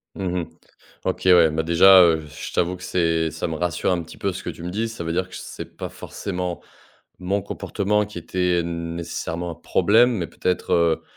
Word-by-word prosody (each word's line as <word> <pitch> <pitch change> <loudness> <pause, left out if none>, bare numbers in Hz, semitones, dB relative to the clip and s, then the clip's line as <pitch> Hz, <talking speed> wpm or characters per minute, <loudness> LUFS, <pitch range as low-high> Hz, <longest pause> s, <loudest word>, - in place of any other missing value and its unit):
Mmh 90 -2 -2
mh. - - -5 0.6
OK, - - -2
ouais. 85 -3 +7
Bah, 80 +1 -1
déjà, 95 +3 +7
heu, 80 -3 +3
je 75 - -8
t'avoue 90 +1 +1
que 90 - -14
c'est 80 -3 +1
ça 80 - -3
me 80 -2 -3
rassure 90 +2 0
un 85 - 0
petit 80 - -12
peu 100 - -1
ce 90 +1 -7
que - - -6
tu 85 - -7
me 90 - -4
dis. 110 +5 -1
Ça 115 -7 -6
veut 85 - -2
dire 90 +1 -1
que - - -13
c'est - - -9
pas - - -5
forcément 90 -3 -5 0.6
mon 95 +2 -1
comportement 105 +3 -1
qui 100 -4 -8
était 90 0 0
nécessairement 85 0 -4
un 80 - -6
problème, 110 +9 +3
mais 85 -6 -2
peut-être, 90 +4 -1
heu, 85 -2 +2
90 Hz, 210 wpm, -23 LUFS, 85-95 Hz, 0.6 s, ouais